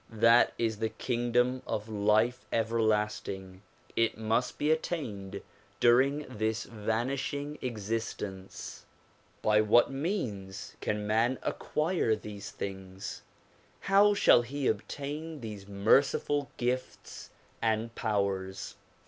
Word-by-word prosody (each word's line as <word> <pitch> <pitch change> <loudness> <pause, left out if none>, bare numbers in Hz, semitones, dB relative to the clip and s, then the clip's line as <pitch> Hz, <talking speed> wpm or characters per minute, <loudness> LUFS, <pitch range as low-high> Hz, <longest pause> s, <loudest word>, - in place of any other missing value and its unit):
That 115 +2 +5
is 110 -2 -1
the 110 - 0
kingdom 125 +2 0
of 105 +1 -2
life 110 +3 +2
everlasting; 105 -4 0 0.3
it 115 -1 +2
must 110 +2 0
be 150 +1 +2
attained 125 - -3 0.4
during 135 +5 +4
this 110 -2 -1
vanish 115 +5 -2
ing 145 +1 -5
existence. 105 -4 -4 0.6
By 105 0 +5
what 110 +4 +5
means 120 - -3
can 105 0 -1
man 115 +4 +2
acquire 155 -8 0
these 105 -2 -8
things? 95 -1 -6 0.6
How 200 +1 +5
shall 120 - +6
he 135 +4 -4
obtain 145 +8 -3
these 105 -3 -7
merciful 135 +7 +2
gifts 125 +1 -3 0.3
and 115 +1 0
powers 100 -4 -2
115 Hz, 105 wpm, -30 LUFS, 105-130 Hz, 0.6 s, shall